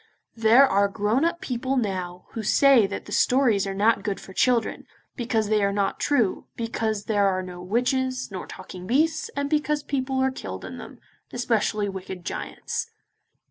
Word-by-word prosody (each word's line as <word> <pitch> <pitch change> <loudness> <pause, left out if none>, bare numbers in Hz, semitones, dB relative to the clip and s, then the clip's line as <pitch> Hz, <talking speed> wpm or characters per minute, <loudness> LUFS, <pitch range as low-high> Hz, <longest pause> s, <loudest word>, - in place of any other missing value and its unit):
There 230 +4 +6
are 200 -1 +3
grown 210 +7 0
up 340 +1 0
people 260 -4 -2
now 185 -5 -3
who 225 - -4
say 240 +1 +5
that 200 - -6
the - - -11
stories 235 -5 +3
are 195 - -2
not 210 +3 +3
good 200 -1 -3
for 190 - -12
children, 240 +2 +1 0.3
because 230 -4 0
they 210 -1 +2
are 200 - +2
not 200 -1 -1
true, 240 -9 +1
because 220 -2 -2
there 205 -2 +2
are 185 -1 0
no 180 -1 -8
witches, 255 +5 -1
nor 185 -2 -6
talking 180 0 -9
beasts, 315 +6 +1
and 280 0 -1
because 300 0 0
people 265 -1 -2
are 265 0 +2
killed 260 - -7
in - - -8
them, - - -10 0.3
especially 220 -4 0
wicked 190 -2 -7
giants. - - -4
225 Hz, 175 wpm, -25 LUFS, 200-260 Hz, 0.3 s, There